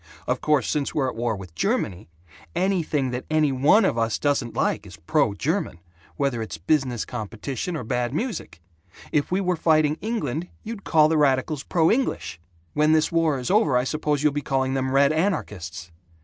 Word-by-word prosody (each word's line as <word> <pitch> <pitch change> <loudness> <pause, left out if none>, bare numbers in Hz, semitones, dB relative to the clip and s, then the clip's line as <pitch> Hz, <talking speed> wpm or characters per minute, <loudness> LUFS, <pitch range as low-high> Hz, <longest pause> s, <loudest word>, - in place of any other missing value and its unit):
Of - - -1
course, 150 -6 +2
since 145 -2 -1
we're 135 -3 +1
at - - -7
war 115 -1 -1
with 95 -4 -10
Germany, 90 +3 -1 0.5
anything 170 -7 0
that 125 +1 -5
any 155 -2 +2
one 145 - +4
of 120 - +1
us 115 -1 +1
doesn't 140 -5 0
like - - 0
is - - -12
'pro 105 - +1
German,' 155 - -1 0.4
whether 135 -5 0
it's 85 -7 -5
business 125 - 0
competition 120 - -5
or 145 - -5
bad 120 +1 -1
music. 155 - -4 0.5
If 145 +2 0
we 185 +2 +1
were 180 -1 +1
fighting 155 -2 +2
England, 180 - -2 0.2
you'd 220 -2 -7
call 155 -2 +5
the 160 0 +1
radicals 140 +1 +2
'pro 165 +1 +2
English.' 240 - -1 0.3
When 150 +1 +3
this 155 0 +2
war 165 -4 +2
is 125 +6 -3
over, 190 - +4
I 125 - +2
suppose 150 +1 -1
you'll 150 -2 +3
be 145 - -1
calling 135 -2 0
them 130 -1 0
'red 140 +2 +4
anarchists.' 95 - -2
145 Hz, 185 wpm, -24 LUFS, 120-160 Hz, 0.5 s, call